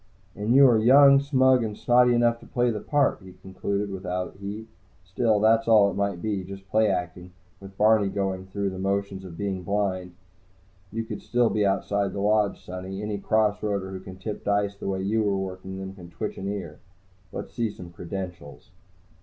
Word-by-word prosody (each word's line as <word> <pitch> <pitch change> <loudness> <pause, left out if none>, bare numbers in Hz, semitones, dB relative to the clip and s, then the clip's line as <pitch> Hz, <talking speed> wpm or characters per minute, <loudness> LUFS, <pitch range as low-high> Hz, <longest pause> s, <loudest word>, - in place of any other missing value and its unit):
"And 105 +4 0
you 140 0 +8
are 115 -3 +4
young, 140 +4 +7
smug 130 -3 +3
and 105 -2 -4
snotty 125 0 +4
enough 120 0 +2
to - - -15
play 120 -1 +1
the 105 - -3
part," 145 -1 +1
he 95 -1 -12
concluded 100 +2 -4
without 90 -1 -4
heat. 100 +3 -7 0.4
"Still, 105 +4 +1
that's 115 +2 +3
all 105 -3 +6
it - - -7
might 100 -3 -2
be, 105 -3 -1
just 95 +1 -10
play 110 0 +4
acting, 90 -1 -4 0.3
with 95 0 -13
Barney 105 -1 +4
going 95 -1 -3
through 100 0 -2
the 95 - -7
motions 100 0 -2
of 85 -3 -10
being 100 -2 -3
blind. 95 -2 -2 0.8
You 115 +2 -3
could 115 - -7 0.3
be 105 -2 +2
outside 100 0 0
the - - -4
Lodge, 105 0 +2
sonny. 95 +2 -6
Any 105 -1 -3
cross 105 0 +1
roader 100 -3 -2
who 95 - -6
can 95 0 -10
tip 105 +2 -6
dice 100 -1 0
the 100 - -7
way 95 -1 -2
you 110 +3 +1
were 100 -2 +1
working 95 0 -6
them 95 0 -6
can 90 -3 -12
twitch 85 +5 -5
an 95 - -4
ear. 95 -7 -5 0.5
Let's - - -7
see 115 -2 -1
some 90 -4 -10
credentials." 85 -4 -8
100 Hz, 195 wpm, -25 LUFS, 95-110 Hz, 0.8 s, you